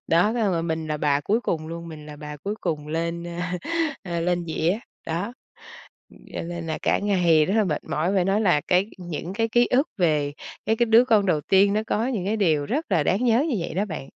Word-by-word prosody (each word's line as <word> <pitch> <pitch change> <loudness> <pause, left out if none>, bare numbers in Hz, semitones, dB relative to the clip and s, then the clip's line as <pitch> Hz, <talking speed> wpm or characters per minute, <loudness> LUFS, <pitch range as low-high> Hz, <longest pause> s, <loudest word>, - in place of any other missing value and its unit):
Đó, 175 +7 +3
xong 215 -5 +1
rồi 165 -1 0
mình 160 -1 -2
là 150 - -1
bà 145 -1 +1
cuối 215 +10 +1
cùng 155 -8 -2
luôn, 170 0 -7
mình 155 -2 -10
là 150 -1 -9
bà 150 0 -8
cuối 200 +8 -4
cùng 155 -4 -2
lên, 170 +2 -2
a, 180 +1 -3 0.4
a, 170 -2 -3
lên 175 0 0
dĩa. 165 +5 0 0.3
Đó, 180 +8 -2 1.0
cho - - -3
nên 170 -1 -5
là 155 - -2
cả - - +2
ngày 175 -6 +3
rất 195 - -1
là 220 - +4
mệt 155 -6 -2
mỏi, 170 +6 -1
phải 185 - +3
nói 195 +3 +2
là 175 -8 +3
cái 185 +2 +3
những 175 0 -5
cái 225 +2 0
ký 240 +2 +3
ức 270 +5 +3
về 150 -5 +1 0.3
cái 220 - +2
cái 240 - +3
đứa 230 +2 +6
con 215 -5 +3
đầu 160 -6 +1
tiên 200 +3 +4
nó 215 - +1
có 225 +4 0
những 215 -9 -2
cái 215 +3 0
điều 155 -7 +2
rất 300 +8 -1
là 165 -5 +3
đáng 200 +10 +1
nhớ 240 +5 +3
như 245 - 0
vậy 165 - -4
đó 195 +4 0
bạn. 160 -9 -5
175 Hz, 240 wpm, -24 LUFS, 160-210 Hz, 1.0 s, đứa